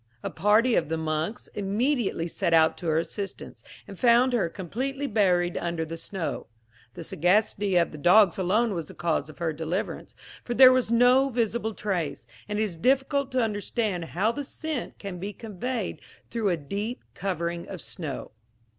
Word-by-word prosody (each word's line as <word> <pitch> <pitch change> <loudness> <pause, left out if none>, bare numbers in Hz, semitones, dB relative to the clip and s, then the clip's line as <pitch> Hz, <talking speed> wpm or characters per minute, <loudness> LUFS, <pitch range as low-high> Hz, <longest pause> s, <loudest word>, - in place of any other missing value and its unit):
A - - -3
party 220 +4 +3
of 160 - +1
the 165 - -1
monks 160 +6 -2
immediately 210 - 0
set 165 0 +1
out 160 0 +5
to 175 - -5
her 160 -1 +2
assistance, 195 +4 -5 0.2
and 195 - -10
found 245 +1 +5
her 205 -8 +1
completely 260 - -4
buried 180 -7 +2
under 170 -1 -2
the 165 +1 -6
snow. 170 0 -4 0.5
The - - -7
sagacity 195 +4 +1
of 170 -1 +3
the 150 - -9
dogs 185 +4 +5
alone 210 +5 +2
was 165 -4 -4
the - - -12
cause 165 -2 -1
of 155 - -12
her 165 -2 -1
deliverance, 165 +5 -4 0.3
for 240 - -3
there 255 0 +9
was 255 -3 +1
no 250 +3 +5
visible 230 -2 -1
trace, 175 -9 -2 0.2
and 210 - -2
it 215 - +2
is 190 -6 -4
difficult 270 - +1
to 255 -2 +2
understand 205 -3 -2
how 195 +7 0
the 285 +4 -4
scent 300 -1 -5
can 195 -3 -7
be 200 +3 -5
conveyed 225 +2 -4 0.3
through 225 -3 0
a 175 - +1
deep 205 - -4
covering 170 -3 -3
of 190 - -7
snow. 160 -7 -6
200 Hz, 175 wpm, -26 LUFS, 170-235 Hz, 0.5 s, there